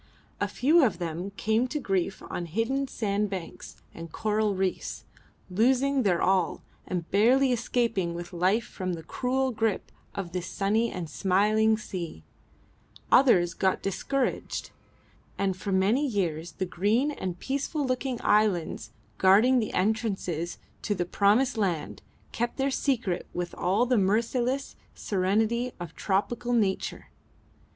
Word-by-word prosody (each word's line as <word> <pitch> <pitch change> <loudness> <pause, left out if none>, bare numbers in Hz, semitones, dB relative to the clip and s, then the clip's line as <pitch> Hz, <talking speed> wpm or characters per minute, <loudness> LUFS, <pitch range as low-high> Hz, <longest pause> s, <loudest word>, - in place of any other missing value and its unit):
A - - +1
few 310 +5 +4
of 210 -9 +2
them 170 +2 -4
came 220 +8 +1
to 300 +4 -3
grief 195 -6 -1
on 175 - -4
hidden 235 - -1
sandbanks 200 -6 -4
and 165 -1 -9
coral 215 0 0
reefs, 190 0 -2 0.4
losing 260 +7 +2
their 185 -7 +2
all 190 0 +1 0.2
and 175 -2 -3
barely 250 +7 +4
escaping 230 -7 0
with 175 +2 -7
life 185 +6 +2
from 185 -2 -4
the 165 -1 -6
cruel 260 +8 -1
grip 220 -3 -1 0.2
of 185 -3 -4
this 180 0 -4
sunny 215 +6 +1
and 180 -3 -5
smiling 210 +6 +2
sea; 170 - -6 0.9
others 180 -10 +5
got 190 0 0
discouraged; 250 +7 -2 0.7
and 195 -1 0
for 195 +2 -5
many 195 +9 +3
years 175 - -2
the 190 - -2
green 210 +11 +1
and 185 -10 -4
peaceful 280 - -2
looking 255 -1 -2
islands 185 - +1 0.3
guarding 220 +7 +5
the 220 - -2
entrances 190 -5 -1 0.2
to 205 - -1
the 175 -2 -1
promised 220 +7 +2
land 180 -7 -2 0.3
kept 240 +1 -2
their 270 0 +1
secret 235 -11 -1
with 175 0 -3
all 190 +7 +1
the 250 -2 +2
merciless 235 +7 0 0.2
serenity 220 +6 0
of 175 -2 -7
tropical 240 +5 -1
nature. 200 -5 -1
205 Hz, 135 wpm, -27 LUFS, 185-245 Hz, 0.9 s, others